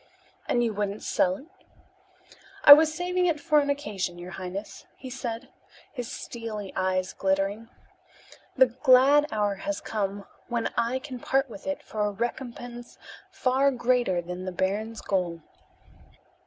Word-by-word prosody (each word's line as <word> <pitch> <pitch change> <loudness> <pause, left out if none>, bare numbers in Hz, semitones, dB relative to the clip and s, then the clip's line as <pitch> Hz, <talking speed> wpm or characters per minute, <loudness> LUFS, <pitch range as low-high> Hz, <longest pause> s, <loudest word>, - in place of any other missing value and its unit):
"And 240 - +2
you 230 -2 0
wouldn't 205 0 -3
sell 185 0 +1
it?" 270 - -12 1.2
"I 285 - +13
was 310 +1 +5
saving 360 +2 0
it 320 -3 +1
for 300 +1 +3
an 285 -1 0
occasion, 210 -11 -2
your 175 +1 -8
highness," 190 +2 -7
he 260 -1 -9
said, 240 -3 -5 0.4
his 245 -4 -5
steely 215 -4 -6
eyes 185 0 0
glittering. 195 +4 -1 0.9
"The 260 - +8
glad 260 +4 +5
hour 205 -1 +1
has 300 +9 -3
come 200 -2 -3 0.2
when 235 -2 -2
I 235 +3 +1
can 260 -2 -7
part 270 +1 0
with 200 +5 -10
it 285 - -3
for 215 - -5
a 210 - +2
recompense 240 +2 -6 0.3
far 265 +2 +2
greater 240 -8 +1
than 180 +1 -6
the 185 - -3
baron's 205 +5 -2
gold." 175 -4 -1
230 Hz, 145 wpm, -27 LUFS, 195-260 Hz, 1.2 s, I